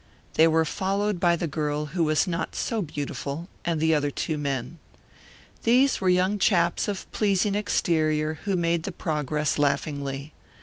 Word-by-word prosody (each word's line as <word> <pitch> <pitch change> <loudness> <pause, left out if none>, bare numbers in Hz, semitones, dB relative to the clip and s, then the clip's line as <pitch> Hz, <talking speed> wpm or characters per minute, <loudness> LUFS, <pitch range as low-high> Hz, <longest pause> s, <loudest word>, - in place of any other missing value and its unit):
They 160 - +5
were 160 0 +3
followed 195 +3 -1
by 175 -1 +4
the 170 - -2
girl 150 -1 -2
who 175 -3 +1
was 155 +2 +2
not 180 -2 -3
so 225 -3 -1
beautiful 145 0 -5 0.2
and 170 -2 -1
the 160 +1 +3
other 145 -1 +1
two 155 +2 -2
men. 140 +1 -3 0.8
These 255 +3 +3
were 185 - +2
young 185 +3 +2
chaps 175 -4 +2
of 200 -2 -3
pleasing 200 -1 +1
exterior 155 -6 0
who 200 -2 +1
made 170 -1 +1
the 195 - -4
progress 150 -3 -1
laughingly. 140 0 -1
165 Hz, 160 wpm, -26 LUFS, 150-185 Hz, 0.8 s, They